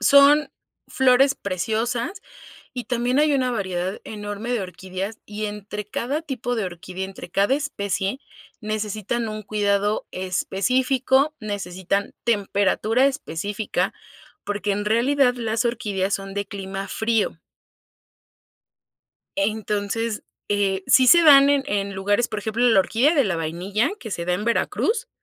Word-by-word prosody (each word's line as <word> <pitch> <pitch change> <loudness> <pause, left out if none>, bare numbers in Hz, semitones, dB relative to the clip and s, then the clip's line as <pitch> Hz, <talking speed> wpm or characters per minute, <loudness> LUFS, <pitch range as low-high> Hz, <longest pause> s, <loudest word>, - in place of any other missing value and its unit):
Son 285 +2 +6 0.4
flores 265 +1 +4
preciosas 230 - -2 0.5
y 245 -1 -5
también 245 +2 0
hay 300 -1 +4
una 255 -2 +1
variedad 190 -4 -2
enorme 205 +2 -6
de 235 - 0
orquídeas, 185 +3 -6
y 210 +1 -5
entre 210 0 -6
cada 270 +8 -2
tipo 250 -4 -3
de 220 -4 -1
orquídea 180 +1 -6
entre 195 -2 -10
cada 200 +8 +2
especie, 205 -5 -2 0.4
necesitan 215 +2 -2
un 215 0 -5
cuidado 205 0 0
específico, 255 +10 +1
necesitan 195 -2 -3
temperatura 215 +3 +2
específica, 205 - -2 0.5
porque 205 0 -2
en 205 +1 -2
realidad 250 +3 +3
las 230 -1 -1
orquídeas 205 -5 -1
son 195 0 -5
de 200 0 -2
clima 195 -1 -5
frío. 220 -6 0 2.0
Entonces, 210 +2 -1 0.3
eh, 195 -2 +1
sí 260 -1 +6
se 340 +5 +8
dan 280 -2 +8
en 285 -1 +3
en 200 -1 -1
lugares 205 +5 +1
por 215 - -4
ejemplo, 220 +4 0
la 195 -4 +6
orquídea 255 - +2
de 280 -5 +4
la 180 -4 0
vainilla 180 - -1
que 220 - -7
se 170 -2 -3
da 180 - 0
en 205 +3 -3
Veracruz, 440 - 0
215 Hz, 135 wpm, -23 LUFS, 195-250 Hz, 2.0 s, se